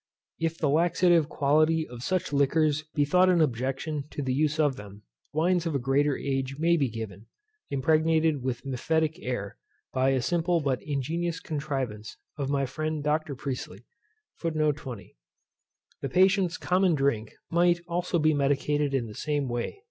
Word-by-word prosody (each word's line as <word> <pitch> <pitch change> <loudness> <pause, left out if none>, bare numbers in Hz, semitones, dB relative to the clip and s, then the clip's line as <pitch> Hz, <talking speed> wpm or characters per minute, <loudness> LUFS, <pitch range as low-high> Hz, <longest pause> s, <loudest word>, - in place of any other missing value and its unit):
If 165 0 -1
the 155 - 0
laxative 170 +1 +3
quality 155 +3 +2
of 120 -1 -10
such 185 +1 -1
liquors 150 +2 +2
be 145 -2 +3
thought 180 +5 +4
an 180 -2 +4
objection 135 +2 -1
to 145 - -5
the 130 -1 -1
use 155 +3 +1
of 145 -3 +3
them, 100 -1 -11 0.3
wines 170 +2 +1
of 160 - -2
a - - +4
greater 135 +2 +1
age 135 -1 -2
may 170 +2 +3
be 140 -6 +1
given, 110 -2 -7 0.4
impregnated 155 +1 +2
with 130 0 -3
mephitic 160 +4 0
air, 100 -5 -4 0.4
by 130 +1 +2
a 135 -1 +2
simple 175 0 +1
but 140 -4 -1
ingenious 165 +4 -2
contrivance 135 -8 -4 0.2
of 140 -2 -3
my 140 -1 +1
friend 155 +3 -3
Dr. 150 -1 0
Priestley. 125 -6 -6 0.6
The 150 - -2 1.0
patient's 185 0 +3
common 180 -2 +2
drink 135 -6 0 0.2
might 175 0 +3
also 175 +1 -1
be 155 -1 +3
medicated 145 0 +1
in 125 -3 0
the 110 - -9
same 145 +2 -1
way. 120 - -3
145 Hz, 155 wpm, -27 LUFS, 135-160 Hz, 1.0 s, thought